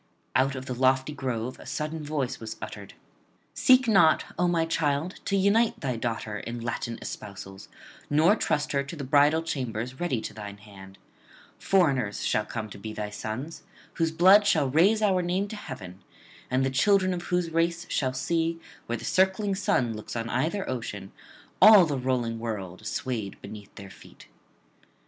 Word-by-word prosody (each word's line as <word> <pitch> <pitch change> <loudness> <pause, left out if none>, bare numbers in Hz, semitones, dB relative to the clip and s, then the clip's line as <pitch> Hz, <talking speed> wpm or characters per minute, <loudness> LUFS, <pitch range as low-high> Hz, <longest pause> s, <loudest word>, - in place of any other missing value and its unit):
Out 135 +1 +2
of 130 0 -6
the 130 - -4
lofty 130 +3 +2
grove 125 -3 -4
a - - -12
sudden 155 0 -4
voice 145 -4 -3
was 110 -1 -7
uttered: - - -9 0.6
'Seek 255 -1 +5
not, 190 -8 +5 0.2
O 180 - +3
my 170 -2 +1
child, 160 +1 -1
to 200 - +1
unite 210 +4 +2
thy 130 -5 -2
daughter 115 -3 -3
in 120 +3 -6
Latin 115 0 -4
espousals, 95 -1 -8 0.4
nor 160 +8 +4
trust 150 -7 -1
her 140 - +1
to 140 +4 -7
the 145 - -6
bridal 145 +4 +3
chambers 125 -4 -4
ready 155 -9 0
to - - -6
thine 105 -1 -8
hand; 95 -2 -14 0.6
foreigners 135 - +1
shall 105 - +1
come 110 -2 -4
to 100 - -9
be 110 +1 -6
thy 105 -1 -5
sons, 135 +10 -6 0.3
whose 165 -1 0
blood 190 +6 +6
shall 150 -9 +2
raise 200 +9 +4
our 190 -3 +3
name 180 +3 -1
to 215 - -6
heaven, 95 - -9 0.5
and 130 +1 +1
the 135 - 0
children 185 +6 +3
of 175 - -4
whose 180 -2 0
race 170 +1 0
shall 130 -2 0
see, 165 +5 -1 0.3
where 120 - -2
the - - -8
circling 190 +2 +2
sun 125 - +1
looks 105 - -8
on 115 0 -3
either 165 +11 -1
ocean, 105 -6 -5 0.5
all 210 -4 +9
the 150 -3 -2
rolling 125 -3 -1
world 105 -3 -5
swayed 115 -7 -4
beneath 105 0 -11
their 100 -1 -10
feet.' - - -16
135 Hz, 170 wpm, -27 LUFS, 115-170 Hz, 0.6 s, all